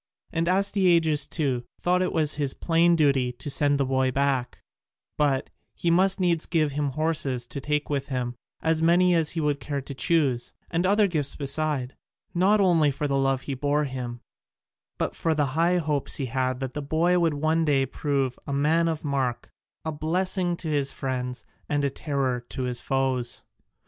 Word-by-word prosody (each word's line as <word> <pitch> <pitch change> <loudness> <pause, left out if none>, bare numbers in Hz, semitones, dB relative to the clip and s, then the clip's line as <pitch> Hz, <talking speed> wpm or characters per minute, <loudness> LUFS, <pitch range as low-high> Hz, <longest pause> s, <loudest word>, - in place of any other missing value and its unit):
And 165 +1 0
Astyages, 180 -5 +3
too, 135 -7 -1 0.2
thought 180 +1 +2
it 160 -4 +1
his 145 -2 -1
plain 170 +1 +3
duty 140 -5 +2
to 145 +4 -6
send 145 0 +2
the 140 - +2
boy 130 0 +1
back, 135 -1 0 0.6
but 140 -3 0 0.2
he 170 - 0
must 190 +3 +3
needs 170 -3 +1
give 155 -4 +1
him 145 +1 -1
horses 145 -5 -1
to 140 - -7
take 150 +1 -1
with 140 -1 -2
him, 125 -3 -2 0.3
as 160 0 +2
many 175 +2 +4
as 165 -2 +2
he - - +2
would 150 -2 0
care 140 +2 -3
to 140 - -8
choose, 135 -2 0 0.2
and 175 +2 +1
other 205 +2 +4
gifts 155 -7 -1
beside, 140 -2 -1 0.4
not 195 +5 +3
only 170 -6 +4
for 145 +2 -2
the 140 - 0
love 135 -1 +1
he 140 - -4
bore 145 +3 0
him 125 -3 -5 0.8
but - - -2
for 160 -1 0
the 150 -1 +2
high 170 +3 +3
hopes 150 -4 0
he 140 - -2
had 130 +1 -1
that 130 -1 -4
the 150 - -4
boy 165 +5 +2
would 165 -3 +1
one 155 +3 +1
day 140 -3 +2
prove 135 -1 -2
a - - -3
man 155 +4 +2
of 160 -2 -3
mark, 135 -4 -2 0.3
a 160 - -1
blessing 175 +3 -1
to 165 - -7
his 145 -3 0
friends, 125 -1 -4 0.2
and 145 -1 +1
a 140 - 0
terror 135 -4 -2
to 130 - -4
his 125 -1 -2
foes. 130 -2 -1
145 Hz, 185 wpm, -26 LUFS, 135-165 Hz, 0.8 s, many